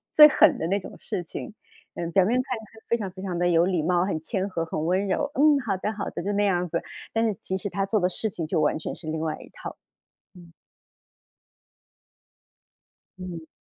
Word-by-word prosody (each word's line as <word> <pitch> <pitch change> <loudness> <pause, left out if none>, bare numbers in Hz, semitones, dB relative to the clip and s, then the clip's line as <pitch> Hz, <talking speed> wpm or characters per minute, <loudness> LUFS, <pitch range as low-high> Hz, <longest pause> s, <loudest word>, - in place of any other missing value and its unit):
最 300 - +11
狠 - - +5
的 - - -1
那 195 +4 +1
种 - - -10
事 180 - -4
情。 175 +5 -7 0.4
嗯， 170 -1 -3
表 190 +1 +4
面 220 +6 +2
看 255 -2 -3
起 220 - -11
来 220 +1 -17
非 235 - +2
常 205 -4 -3
非 185 0 -9
常 185 -3 -3
地 175 0 +2
有 170 -1 +4
礼 180 -2 +1
貌， 175 +3 +2
很 185 -5 -1
谦 190 +4 -2
和， 170 -4 -2
很 155 -1 -3
温 185 +4 +1
柔， 285 +8 0
“嗯， 295 0 +6
好 210 -7 -1
的 210 - -2
好 210 -2 -4
的。” - - -5
就 200 +3 -1
那 205 0 +2
样 180 -3 +1
子， 170 +1 -1 0.3
但 225 0 +2
是 220 - +2
其 190 - -2
实 200 +1 -4
他 195 +1 -1
做 210 +2 +1
的 180 - +3
事 215 +4 -3
情 175 -4 -4
就 155 - 0
完 150 - +2
全 - - -5
是 160 0 -12
另 155 0 -2
外 155 -1 -1
一 - - -12
套。 - - -8 0.6
嗯。 175 -2 -14 2.7
嗯。 175 -3 -7
185 Hz, 245 characters per minute, -26 LUFS, 170-205 Hz, 2.7 s, 最